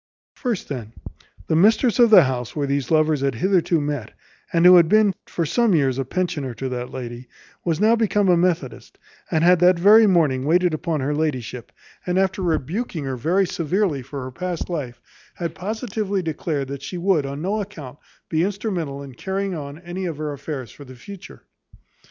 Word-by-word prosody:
First, 240 -8 -3
then, 120 -6 -6 0.5
the 160 - 0
mistress 220 - +3
of 240 -1 +7
the 215 - +8
house 125 -3 -3
where 145 -2 -1
these 140 -1 -2
lovers 155 -2 +2
had 135 -2 0
hitherto 175 - +2
met, 145 -6 -4 0.4
and 170 0 +2
who 180 0 +9
had 170 -2 +5
been 215 -1 +4
for 170 - -2
some 230 +4 +2
years 135 -4 +1
a 135 - -1
pensioner 145 -5 -3
to 135 - -4
that 125 -1 -4
lady, 120 -1 -7 0.4
was 165 -2 -1
now 220 +3 +4
become 210 -3 +1
a 180 - +5
methodist, 170 -9 -2 0.3
and 160 0 +1
had 180 0 +5
that 180 0 +5
very 210 +5 +7
morning 155 -9 +2
waited 175 +3 +2
upon 155 -1 -2
her 140 +3 -1
ladyship, 130 -6 -3 0.3
and 180 0 -1
after 190 +1 +1
rebuking 170 - -2
her 135 -1 -3
very 175 +10 +1
severely 170 -3 -1
for 135 +1 -7
her 130 - -7
past 180 +4 -4
life, 135 -8 -4 0.4
had 170 -2 -4
positively 205 0 -3
declared 150 -3 -3
that 140 -1 -6
she 180 +6 -6
would, 175 -5 +1
on 140 +1 -5
no 210 +3 -1
account, 155 -10 -9 0.3
be 160 -1 0
instrumental 180 -8 -3
in 135 -2 -10
carrying 195 +7 -3
on 145 -3 -6
any 175 +2 -5
of 160 -4 -5
her 150 -1 -4
affairs 140 -3 -6
for 145 - -13
the 130 -2 -12
future. 195 +10 -12
165 Hz, 190 wpm, -22 LUFS, 140-190 Hz, 0.5 s, who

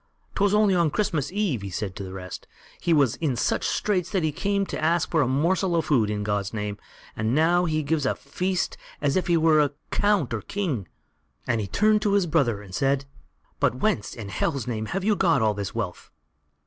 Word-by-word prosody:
"Twas 200 +1 +2
only 210 -2 +4
on 170 -3 +3
Christmas 155 -5 -1
eve," 190 - 0
he 100 - -5
said 95 +1 -4
to 100 - -6
the 95 - -7
rest, 90 -1 -8 0.3
"he 170 - -1
was 140 -7 +3
in 150 -6 0
such 120 - 0
straits 185 -5 0
that 190 -5 0
he 155 - +1
came 200 +5 0
and - - -7
asked 165 +2 +1
for 160 - +3
a 135 - +2
morsel 170 +7 +1
of 165 -3 +1
food 115 -8 +2
in 105 -1 -2
God's 105 0 -2
name, 105 -1 -3 0.4
and 110 +3 0
now 175 +3 +3
he 155 -2 0
gives 150 -2 0
a - - +1
feast 180 +6 -2 0.2
as 145 -2 +1
if 185 - +1
he 170 -1 +3
were 155 -3 +4 0.2
count 205 - +2
or 110 - -2
king;" 155 - -3 0.6
and 115 -3 0
he 100 - -3
turned 215 - +3
to 210 -2 +1
his 200 -2 +3
brother 135 -11 +1
and 95 -2 -13
said: 135 +5 +1 0.5
"But 135 -4 +2
whence, 130 - -1
in 110 -4 -7
Hell's 130 +5 -1
name, 110 -3 -3
have 195 - -2
you 210 +1 +3
got 165 - +3
all 110 -1 +3
this 100 -1 -5
wealth?" 105 -6 -4
150 Hz, 215 wpm, -25 LUFS, 110-180 Hz, 0.6 s, only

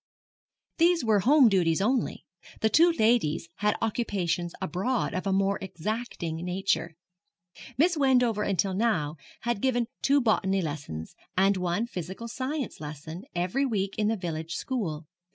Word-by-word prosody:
These 340 -4 +4
were 215 -2 +4
home 265 +6 +6
duties 175 -6 +2
only. 245 +6 0 0.4
The 220 - +3
two 335 +3 +6
ladies 220 - +2
had 210 0 +1
occupations 190 -6 -1
abroad 220 +10 -1
of 185 +2 -2
a - - +1
more 195 +1 +1
exacting 190 -2 -4
nature. 180 -2 -1 0.8
Miss 340 +5 +4
Wendover 250 -6 +3
until 195 -1 0
now 185 -8 0 0.2
had 235 -3 -1
given 245 -2 +1 0.2
two 280 +1 +4
botany 195 -6 +1
lessons, 140 - -5 0.2
and 195 +1 +4
one 180 +4 0
physical 190 +1 -6
science 260 +2 -4
lesson, 155 +4 -7
every 180 +11 0
week 200 -7 -1
in 210 - +2
the 225 +1 +1
village 165 -2 -4
school. 170 - -3
200 Hz, 140 wpm, -28 LUFS, 175-240 Hz, 0.8 s, home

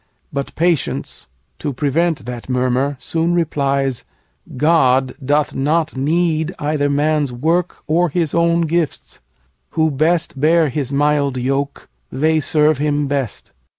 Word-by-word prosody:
But 140 -1 -4
patience, 170 -3 -1 0.3
to 145 - -3
prevent 150 +1 0
That 120 0 -7
murmur, 130 +2 0
soon 165 +7 -1
replies, 140 -5 0 0.5
'God 135 -4 +3
doth 145 +2 +1
not 155 +3 0
need 160 +4 0
Either 145 -1 0
man's 145 -1 +1
work 165 +8 -1
or 170 +2 +2
his 165 -1 -1
own 170 0 +2
gifts. 165 -1 -2 0.6
Who 160 -1 +3
best 155 0 0
Bear 160 0 +4
his 135 0 -3
mild 145 -1 +1
yoke, 135 +3 -2 0.2
they 155 +3 +2
serve 150 -1 +2
him 145 0 0
best. 135 -5 -3
150 Hz, 125 wpm, -18 LUFS, 135-160 Hz, 0.6 s, Bear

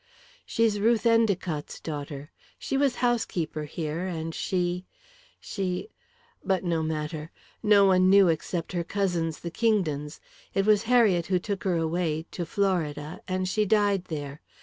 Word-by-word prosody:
"She's 225 -2 +1
Ruth 225 +2 +2
Endicott's 200 -9 +1
daughter. 145 -1 -6 0.3
She - - -3
was 270 -2 +2
housekeeper 170 -10 -1
here 155 +2 -4
and 165 -2 -4
she 180 0 -1 0.5
she 190 - -3 0.5
But 190 -2 0
no 170 -2 0
matter. 155 0 -3 0.3
No 205 -1 +6
one 185 -1 +5
knew 195 -1 +7
except 165 +1 -1
her 175 -1 -1
cousins, 170 -4 -1
the 170 - -5
Kingdons. 160 -9 0 0.4
It 195 - +2
was 210 -1 +4
Harriet 210 -9 +4
who 185 - +2
took 195 +2 -4
her 185 -2 +2
away 165 -1 -1
to 175 -2 -4
Florida 165 -5 -1
and 185 0 -1
she 215 +3 +1
died 205 -2 +2
there. 145 -2 -6
180 Hz, 145 wpm, -27 LUFS, 160-200 Hz, 0.5 s, knew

